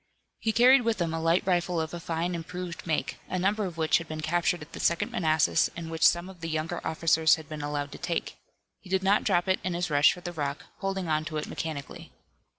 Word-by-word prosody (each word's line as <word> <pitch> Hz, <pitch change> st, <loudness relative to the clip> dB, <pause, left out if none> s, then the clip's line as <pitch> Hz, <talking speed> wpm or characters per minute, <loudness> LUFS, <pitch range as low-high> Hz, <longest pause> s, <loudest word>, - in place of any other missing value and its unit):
He 225 Hz, -, 0 dB
carried 250 Hz, +4 st, +6 dB
with 230 Hz, -3 st, 0 dB
him 165 Hz, -2 st, -1 dB
a 165 Hz, -, -2 dB
light 165 Hz, +2 st, +2 dB
rifle 175 Hz, -2 st, +1 dB
of 160 Hz, 0 st, -3 dB
a 175 Hz, -, -4 dB
fine 170 Hz, +1 st, -2 dB
improved 175 Hz, +1 st, -6 dB
make, 160 Hz, -, -1 dB
a 185 Hz, -, -1 dB
number 200 Hz, +3 st, +1 dB
of 175 Hz, -3 st, -6 dB
which 160 Hz, +1 st, +3 dB
had 165 Hz, -, -8 dB
been 155 Hz, 0 st, -5 dB
captured 175 Hz, +1 st, 0 dB
at 150 Hz, -, -16 dB
the -, -, -7 dB
Second 170 Hz, -1 st, +1 dB
Manassas, 155 Hz, -3 st, +2 dB
and 165 Hz, -1 st, -6 dB
which 160 Hz, -1 st, -5 dB
some 175 Hz, +1 st, +1 dB
of 190 Hz, -3 st, -12 dB
the 165 Hz, -, -4 dB
younger 155 Hz, 0 st, -2 dB
officers 160 Hz, 0 st, +3 dB
had 160 Hz, -2 st, -11 dB
been 155 Hz, -1 st, -6 dB
allowed 145 Hz, -1 st, -3 dB
to -, -, -9 dB
take. -, -, -2 dB, 0.4 s
He -, -, -15 dB
did 190 Hz, 0 st, +1 dB
not 200 Hz, +2 st, +3 dB
drop 175 Hz, -2 st, +2 dB
it 190 Hz, -, +2 dB
in 180 Hz, -1 st, -2 dB
his 175 Hz, -1 st, -2 dB
rush 145 Hz, +1 st, +6 dB
for 180 Hz, -, -11 dB
the 175 Hz, 0 st, -6 dB
rock, 145 Hz, -3 st, -3 dB
holding 195 Hz, -2 st, -2 dB
on 155 Hz, -1 st, +1 dB
to 155 Hz, -1 st, -4 dB
it 150 Hz, -, -2 dB
mechanically. 155 Hz, -4 st, -6 dB
170 Hz, 245 wpm, -28 LUFS, 160-180 Hz, 0.4 s, carried